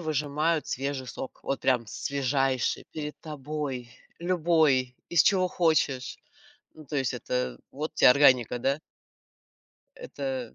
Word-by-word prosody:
выжимают 155 +1 0
свежий 135 0 -3
сок. 130 +1 -7
Вот 135 - -2
прям 125 -3 +1
свежайший 135 0 -1
перед 150 -1 -6
тобой. 145 -4 -5 0.3
Любой, 160 -7 +2
из 170 - +5
чего 185 -3 +3
хочешь. 155 -7 0 0.6
Ну, 155 -1 -13
то 145 - -6
есть 135 -4 +1
это 65 -1 -2
вот 150 +3 -5
те - - +7
органика, 125 -3 +5
да? 140 +4 0 1.2
Это 130 -4 -5
140 Hz, 120 wpm, -27 LUFS, 130-155 Hz, 1.2 s, те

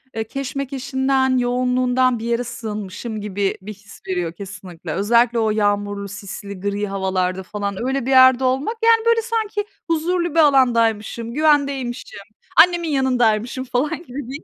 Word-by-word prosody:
eee, 225 - -1
keşmekeşinden, 265 0 -1
yoğunluğundan 250 0 +1
bir 225 - -6
yere 235 +1 0
sığınmışım 215 -2 -6
gibi 200 -1 -2
bir 210 +3 -8
his 205 +1 -16
veriyor, 180 -3 -2
kesinlikle. 180 -3 -9
Özellikle 235 +5 +2
o 220 -1 +1
yağmurlu, 205 -1 -1
sisli, 200 -1 -8
gri 200 +2 -2
havalarda 190 -1 -1
falan 200 +1 -4
öyle 265 -2 -1
bir 265 - -1
yerde 260 -1 +6
olmak, 265 - 0
yani, 455 0 +4
böyle, 465 0 +4
sanki 435 -2 -2 0.2
huzurlu 340 +1 0
bir - - +4
alandaymışım, 235 -5 +2
güvendeymişim, 280 -6 0 0.4
annemin 340 0 +5
yanındaymışım 250 -3 +1
falan 260 +6 -2
gibi 265 -4 -7
bir 270 - -5
his 315 - -9
245 Hz, 145 wpm, -20 LUFS, 205-275 Hz, 0.4 s, yerde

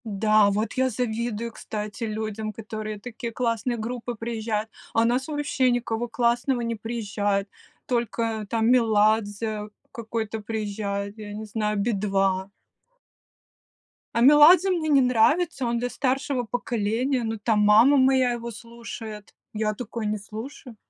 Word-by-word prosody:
Да, 215 0 +3
вот 210 +2 -1
я 260 0 +1
завидую, 235 -1 -2
кстати, 210 0 -5
людям, 215 0 -4
к - - -23
которым 215 -1 -6
такие 235 +1 -6
классные 235 0 -1
группы 240 +2 -4
приезжают. 220 -1 -3 0.2
А 225 - +3
у - - +4
нас 250 +3 +1
вообще 290 -4 0
никого 240 -1 -1
классного 240 +2 +1
не 230 0 -2
приезжает, 205 -3 -2 0.4
только 230 -3 -1
там 225 -1 +1
Меладзе 215 -2 +2 0.2
какой-то 225 -1 -4
приезжает, 205 -1 -4
я 205 -1 -7
не 215 +1 -6
знаю, 210 0 -2
"Би-2". 195 -3 0 1.6
А - - +2
Меладзе 310 +6 +7
мне 330 -4 0
не 280 -2 +5
нравится. 260 +5 +2
Он 235 0 0
для 245 +1 -2
старшего 265 0 -1
поколения, 240 +2 -1
ну, 225 0 -2
там 215 0 +1
мама 220 +7 +6
моя 260 -1 +4
его 235 0 -5
слушает. 225 -3 -9 0.2
Я 215 0 0
такое 230 0 -5
не 210 0 0
слушаю. 225 +4 -9
225 Hz, 140 wpm, -25 LUFS, 215-245 Hz, 1.6 s, Меладзе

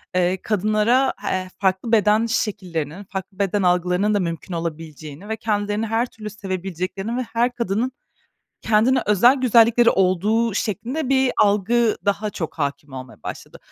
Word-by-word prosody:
eee, 185 0 +1
kadınlara, 215 +5 +2
h 185 0 -3
farklı 190 +3 0
beden 215 0 +4
şekillerinin, 185 -7 -3
farklı 190 0 -7
beden 200 0 0
algılarının 180 +3 +2
da 205 - +2
mümkün 170 0 -4
olabileceğini 160 +1 -6
ve 220 - -2
kendilerini 210 0 -1
her 225 +2 +1
türlü 215 -3 -9
sevebileceklerini 195 +1 -4
ve - - 0
her 235 +1 0
kadının 235 +2 -1 0.7
kendine 225 +4 +3
özel 225 +6 +5
güzellikleri 235 -2 +5
olduğu 205 +5 +1
şeklinde 235 +9 -2
bir 265 -1 +3
algı 215 +2 +2
daha 200 +1 0
çok 165 -6 -5
hâkim 140 -1 -3
olmaya 130 - -10
başladı. - - -8
205 Hz, 140 wpm, -22 LUFS, 185-225 Hz, 0.7 s, özel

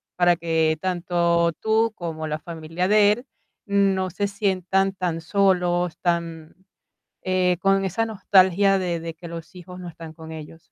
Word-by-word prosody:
para 175 -1 +4
que 160 -2 +1
tanto 170 -2 +1
tú 220 +1 +2
como 160 -2 -5
la 155 0 -3
familia 165 +2 -4
de 210 0 +5
él 245 +4 -8 0.4
no 195 -2 +1
se 200 +3 -2
sientan 195 -1 0
tan 175 -3 -3
solos, 180 -2 +1
tan, 170 -2 -2 0.7
eh, 185 -1 +1
con 195 0 +2
esa 225 +5 -1
nostalgia 195 -2 +3
de 175 -3 -2
de 165 -1 -6
que 170 +1 -10
los 165 +2 -9
hijos 180 0 -11
no 175 - -7
están 165 -1 -10
con 160 0 -10
ellos. 160 +1 -9
180 Hz, 155 wpm, -23 LUFS, 165-195 Hz, 0.7 s, de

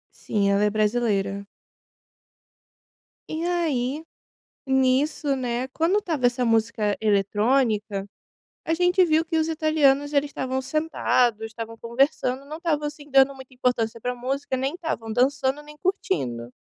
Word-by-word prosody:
Sim, 200 -2 0
ela 200 +1 +2
é 210 - +3
brasileira. 205 -2 0 1.9
E 320 +2 -3
aí, 310 -5 -1 0.6
nisso, 270 +2 +2
né, 250 0 -2
quando 330 +9 +1
estava 315 -10 -1
essa 245 +1 +2
música 225 -2 +1
eletrônica, 210 0 +1 0.6
a 325 - -1
gente 360 +2 +3
viu 320 -1 +2
que 325 0 -2
os 315 0 +1
italianos, 300 -3 +2
eles 285 0 +1
estavam 260 -1 -2
sentados. 255 -7 +1
Estavam 225 0 -7
conversando, 255 +2 0
não 305 +2 -6
estavam, 305 -3 -1
assim, 295 0 -8
dando 270 +1 +5
muita 265 -1 -13
importância 235 -3 -1
pra 250 +2 -2
música. 260 +2 -3
Nem 270 +4 -2
estavam 275 -11 -4
dançando 265 +3 +1
nem 300 0 -13
curtindo. 135 - -2
260 Hz, 135 wpm, -24 LUFS, 225-300 Hz, 1.9 s, dando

